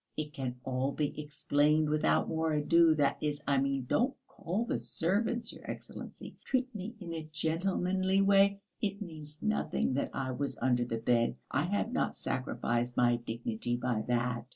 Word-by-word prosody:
It 150 Hz, -1 st, -3 dB
can 130 Hz, -3 st, -3 dB
all 130 Hz, +1 st, 0 dB
be 150 Hz, -2 st, -1 dB
explained 150 Hz, +1 st, +2 dB
without 150 Hz, 0 st, +2 dB
more 160 Hz, -1 st, 0 dB
ado, 160 Hz, +2 st, +5 dB
that 145 Hz, -2 st, +2 dB
is, 150 Hz, -1 st, -1 dB
I 140 Hz, -1 st, +3 dB
mean, 135 Hz, -1 st, 0 dB
don't 250 Hz, -, +1 dB
call 195 Hz, +8 st, -3 dB
the -, -, -1 dB
servants, 225 Hz, +8 st, 0 dB
your -, -, -13 dB
Excellency! -, -, -8 dB
Treat 260 Hz, -1 st, 0 dB
me 210 Hz, +3 st, -6 dB
in 170 Hz, -4 st, -6 dB
a 160 Hz, -1 st, -6 dB
gentlemanly 185 Hz, +4 st, +1 dB
way.... 200 Hz, 0 st, +5 dB, 0.2 s
It 200 Hz, -1 st, -1 dB
means 155 Hz, -6 st, -9 dB
nothing 215 Hz, -10 st, 0 dB
that 140 Hz, -, 0 dB
I 130 Hz, -1 st, -1 dB
was 140 Hz, +2 st, -2 dB
under 125 Hz, -1 st, +2 dB
the 115 Hz, -1 st, -2 dB
bed, 115 Hz, +1 st, +2 dB, 0.2 s
I 145 Hz, -, +1 dB
have 205 Hz, +5 st, 0 dB
not -, -, 0 dB
sacrificed 120 Hz, -1 st, -1 dB
my 120 Hz, -1 st, +4 dB
dignity 115 Hz, 0 st, -3 dB
by 125 Hz, -3 st, 0 dB
that. 120 Hz, 0 st, 0 dB
150 Hz, 170 wpm, -32 LUFS, 125-185 Hz, 0.2 s, ado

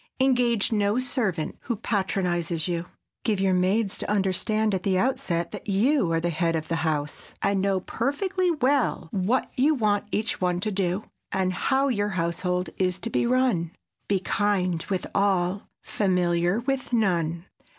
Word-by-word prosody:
Engage 245 Hz, -5 st, +2 dB
no 205 Hz, 0 st, +2 dB
servant 225 Hz, -, -1 dB
who 240 Hz, -, -3 dB
patronizes 180 Hz, -5 st, -1 dB
you. 175 Hz, -1 st, -2 dB, 0.4 s
Give 210 Hz, -4 st, +1 dB
your 190 Hz, -1 st, +2 dB
maids 195 Hz, +3 st, +1 dB
to -, -, -3 dB
understand 210 Hz, +2 st, +1 dB
at 190 Hz, -, 0 dB
the 190 Hz, -1 st, +1 dB
outset 175 Hz, -7 st, 0 dB
that -, -, -7 dB
you 210 Hz, -, +2 dB
are 165 Hz, -, +2 dB
the 170 Hz, +1 st, -1 dB
head 165 Hz, +1 st, 0 dB
of 160 Hz, -1 st, -3 dB
the 165 Hz, -, 0 dB
house, 150 Hz, -3 st, -2 dB
and 200 Hz, -1 st, +2 dB
know 195 Hz, -1 st, +1 dB
perfectly 355 Hz, -, -1 dB
well 275 Hz, -, +1 dB
what 205 Hz, +7 st, 0 dB
you 295 Hz, +4 st, +3 dB
want 210 Hz, -5 st, +1 dB
each 215 Hz, -2 st, -1 dB
one 180 Hz, -1 st, +1 dB
to 215 Hz, -, -1 dB
do, 190 Hz, 0 st, -1 dB, 0.3 s
and 185 Hz, -1 st, 0 dB
how 270 Hz, +8 st, +1 dB
your 205 Hz, -5 st, 0 dB
household 180 Hz, 0 st, -1 dB
is 185 Hz, -1 st, +1 dB
to 230 Hz, +4 st, -5 dB
be 235 Hz, -, +1 dB
run. 240 Hz, -10 st, +1 dB, 0.3 s
Be 200 Hz, -, +2 dB
kind 185 Hz, -3 st, 0 dB
with 190 Hz, -2 st, -1 dB
all—familiar 180 Hz, -1 st, 0 dB
with 270 Hz, +1 st, -2 dB
none. 170 Hz, -6 st, +1 dB
195 Hz, 160 wpm, -26 LUFS, 175-230 Hz, 0.4 s, you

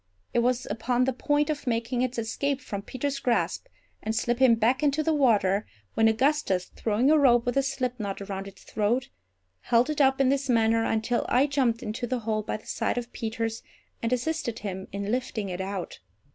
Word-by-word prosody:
It 240 Hz, -, +3 dB
was 250 Hz, +1 st, +1 dB
upon 240 Hz, +4 st, 0 dB
the 265 Hz, +1 st, +1 dB
point 290 Hz, +4 st, +1 dB
of 290 Hz, -3 st, -5 dB
making 235 Hz, +1 st, 0 dB
its 255 Hz, -1 st, -1 dB
escape 265 Hz, +5 st, -1 dB
from 205 Hz, -7 st, -5 dB
Peter's 275 Hz, +6 st, -3 dB
grasp, 215 Hz, -9 st, 0 dB, 0.3 s
and 220 Hz, +1 st, -2 dB
slipping 240 Hz, +1 st, +3 dB
back 235 Hz, +4 st, +2 dB
into 295 Hz, +1 st, +2 dB
the 320 Hz, +1 st, +2 dB
water, 210 Hz, -8 st, +2 dB, 0.3 s
when 225 Hz, -, +4 dB
Augustus, 225 Hz, -5 st, +1 dB
throwing 230 Hz, +6 st, +2 dB
a 310 Hz, -, +5 dB
rope 240 Hz, -4 st, +5 dB
with 245 Hz, -, -1 dB
a 275 Hz, -, +4 dB
slipknot 250 Hz, -7 st, -3 dB
around 195 Hz, -1 st, -5 dB
its 195 Hz, -1 st, -13 dB
throat, 230 Hz, +4 st, 0 dB, 0.5 s
held 235 Hz, -, +2 dB
it 300 Hz, -, 0 dB
up 270 Hz, 0 st, +4 dB
in 270 Hz, -1 st, +4 dB
this 275 Hz, 0 st, 0 dB
manner 225 Hz, -1 st, +3 dB
until 225 Hz, +2 st, 0 dB
I 260 Hz, +3 st, +4 dB
jumped 260 Hz, -5 st, 0 dB
into 225 Hz, +3 st, -3 dB
the 250 Hz, 0 st, -2 dB
hole 215 Hz, -1 st, -1 dB
by 215 Hz, -, -3 dB
the 215 Hz, -, -20 dB
side -, -, -1 dB
of 245 Hz, 0 st, -4 dB
Peters, 225 Hz, 0 st, -3 dB, 0.4 s
and 230 Hz, -, -1 dB
assisted 250 Hz, -2 st, -1 dB
him 190 Hz, -3 st, -5 dB
in 200 Hz, +1 st, -3 dB
lifting 235 Hz, -5 st, -2 dB
it 180 Hz, +1 st, -4 dB
out. 190 Hz, -1 st, -5 dB
235 Hz, 195 wpm, -27 LUFS, 215-265 Hz, 0.5 s, a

